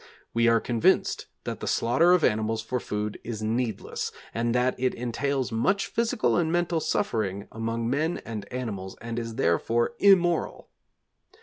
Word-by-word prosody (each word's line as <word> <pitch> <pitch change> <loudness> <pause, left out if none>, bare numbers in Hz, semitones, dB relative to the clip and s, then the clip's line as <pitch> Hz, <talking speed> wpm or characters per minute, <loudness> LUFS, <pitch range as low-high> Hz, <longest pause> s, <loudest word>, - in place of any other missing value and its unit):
We 115 0 +3
are 115 0 +5
convinced 115 -2 +1 0.2
that - - -4
the - - -5
slaughter 160 +10 +3
of 180 -3 +3
animals 110 +1 +1
for 125 +2 -2
food 105 -1 -4
is 110 -2 -5
needless, 115 +1 -2 0.2
and 115 +1 0
that 125 +1 +2
it 130 0 +1
entails 130 +2 -1
much 195 - +1
physical 235 0 +1
and 165 -2 +1
mental 175 -1 +1
suffering 105 -10 -1
among 115 +1 -2
men 155 +7 0
and 105 -3 -6
animals 105 -7 -5
and 115 0 -4
is 115 -1 -5
therefore 115 +8 +1
immoral. 180 -4 +3
115 Hz, 150 wpm, -27 LUFS, 110-150 Hz, 0.2 s, are